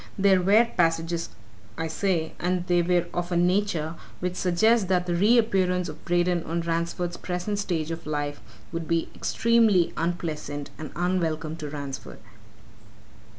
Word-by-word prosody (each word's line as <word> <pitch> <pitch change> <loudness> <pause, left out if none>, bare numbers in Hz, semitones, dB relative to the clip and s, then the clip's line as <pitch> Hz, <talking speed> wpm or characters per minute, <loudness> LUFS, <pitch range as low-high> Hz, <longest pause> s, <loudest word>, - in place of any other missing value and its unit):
There 195 -2 +4
were 205 +6 +5
passages, 165 0 +1 0.5
I 160 - -2
say, 165 0 -1
and 180 0 0
they 175 -1 +3
were 175 0 +2
of 175 0 -3
a 175 - +2
nature 175 -3 +1 0.3
which 180 0 -2
suggests 190 +4 +3
that 180 -1 +2
the 175 - -1
re 205 +8 +4
appearance 185 -5 +2
of 155 - -10
Braden 175 -1 +1
on 170 +2 -1
Ransford's 170 +1 -2
present 180 +3 -3
stage 165 -5 -2
of 165 -1 -6
life 145 -4 -3 0.3
would 165 -1 -4
be, 165 -1 0
extremely 225 -6 +3
unpleasant 155 -4 -3
and 155 -2 -6
unwelcome 165 -3 -1
to 150 -3 -6
Ransford." 140 -2 -6
175 Hz, 150 wpm, -26 LUFS, 165-185 Hz, 0.5 s, were